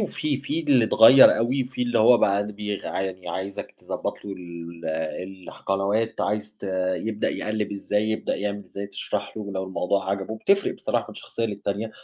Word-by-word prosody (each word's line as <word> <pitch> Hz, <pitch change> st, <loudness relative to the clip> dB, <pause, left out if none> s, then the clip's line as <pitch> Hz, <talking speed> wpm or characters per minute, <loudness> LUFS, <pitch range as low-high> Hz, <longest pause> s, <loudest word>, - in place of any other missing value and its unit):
وفي. 155 Hz, -7 st, -1 dB
في 145 Hz, +4 st, -2 dB
اللي 140 Hz, -7 st, +4 dB
اتغير 115 Hz, +4 st, +8 dB
أوي، 130 Hz, +3 st, +1 dB
في 125 Hz, 0 st, -4 dB
اللي 120 Hz, -1 st, +1 dB
هو 120 Hz, +2 st, +7 dB
بقى 100 Hz, 0 st, +2 dB
د 105 Hz, -, -6 dB
بيغ 105 Hz, -1 st, -4 dB
عاني 95 Hz, -1 st, -3 dB
عايزك 100 Hz, +2 st, -4 dB
تضبط -, -, -5 dB
له 100 Hz, -, -5 dB
ال 85 Hz, -1 st, -9 dB, 0.6 s
الح -, -, -10 dB
قنوات 100 Hz, +3 st, 0 dB
عايز 105 Hz, 0 st, -2 dB
ت -, -, -22 dB, 0.3 s
يبدأ 110 Hz, -1 st, -1 dB
يقلّب 105 Hz, -1 st, -2 dB
إزاي، 105 Hz, +2 st, 0 dB
يبدأ 110 Hz, -, -1 dB
يعمل 100 Hz, 0 st, -3 dB
إزاي 100 Hz, +2 st, -6 dB
تشرح 100 Hz, +1 st, -4 dB
له 110 Hz, -, -4 dB
ولو 95 Hz, -2 st, -3 dB
الموضوع 95 Hz, +1 st, -1 dB
عجبه 100 Hz, +3 st, -3 dB
بتفرق 200 Hz, -, +2 dB
بصراحة -, -, -1 dB
من -, -, -9 dB
شخصية 115 Hz, -, -4 dB
للتانية، 100 Hz, +1 st, -3 dB
105 Hz, 180 wpm, -25 LUFS, 100-115 Hz, 0.6 s, اتغير